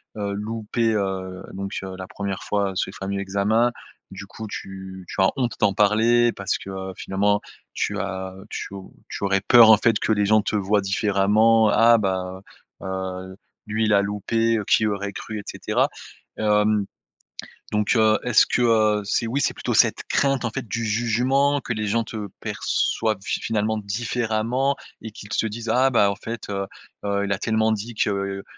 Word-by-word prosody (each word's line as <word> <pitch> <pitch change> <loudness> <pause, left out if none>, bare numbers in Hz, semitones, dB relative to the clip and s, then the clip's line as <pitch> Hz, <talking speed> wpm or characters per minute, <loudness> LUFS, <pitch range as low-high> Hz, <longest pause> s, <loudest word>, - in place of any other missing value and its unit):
heu, 100 -2 -3
loupé, 110 +2 -1
heu, 95 -2 -3
donc 100 0 -6
heu, 95 -1 -7
la 95 0 -7
1re 100 -1 -5
fois, 100 -1 0
ce - - -1
fameux 100 +1 -3
examen. 100 +5 +1 0.4
Du 95 +1 -8
coup 110 +2 -8
tu 95 -2 -8
tu - - -2
as 95 - +5
honte 125 -4 -1
d'en 100 -2 +2
parler 115 +3 +4
parce 100 -2 -2
que 95 - -9 0.3
finalement, 100 +1 0 0.3
tu - - -1
as 95 -1 -4 0.2
tu - - -6
au 95 -1 -9 0.2
tu - - -6
aurais 100 0 +2
peur 115 +3 +7
en 110 - +9
fait, 110 0 +2
que - - 0
les 105 -1 +2
gens 110 +1 +4
te 105 - -2
voient 100 0 +2
différemment. 105 +3 +3
«Ah 115 +1 +5
ben, 95 -1 -2 0.4
heu, - - -8
heu, 95 0 -5 0.3
lui 110 +1 0
il 105 - +2
a 100 - +5
loupé, 115 +3 0
heu, 105 - -2
qui 110 - +3
aurait 100 -1 -3
cru» 110 +2 -6
et 100 - -8
cetera. - - 0 0.5
Hem, 105 -1 +2 0.9
donc 105 +2 +1
heu, 110 -1 +4
est-ce 120 -3 +4
que, 125 - 0 0.4
heu, - - -8
c'est 110 +3 0
oui, 130 +5 -1
c'est - - +1
plutôt - - -3
cette - - +3
crainte 135 -2 +1
en 115 - 0
fait 125 -1 -6
du 115 +2 -2
jugement 125 +6 +1
que 125 - -4
les 105 -1 -2
gens 115 +2 +1
te 110 -2 -6
perçoivent 110 -3 -1
fi - - -2
finalement 110 0 -1
différemment 115 +5 -1 0.3
et 110 - -6
qu'ils 105 0 -11
se - - +1
disent: 115 +2 -7
«Ah 130 +2 +4
bah, 100 -5 +3
en - - -7
fait, 115 +1 -7
heu, 100 -1 -2 0.4
heu, 100 0 0
il 100 - -1
a 100 - -1
tellement 110 +1 +1
dit 110 +2 -4
que, 105 - +1
heu, 100 -1 -3
105 Hz, 190 wpm, -23 LUFS, 100-115 Hz, 0.9 s, en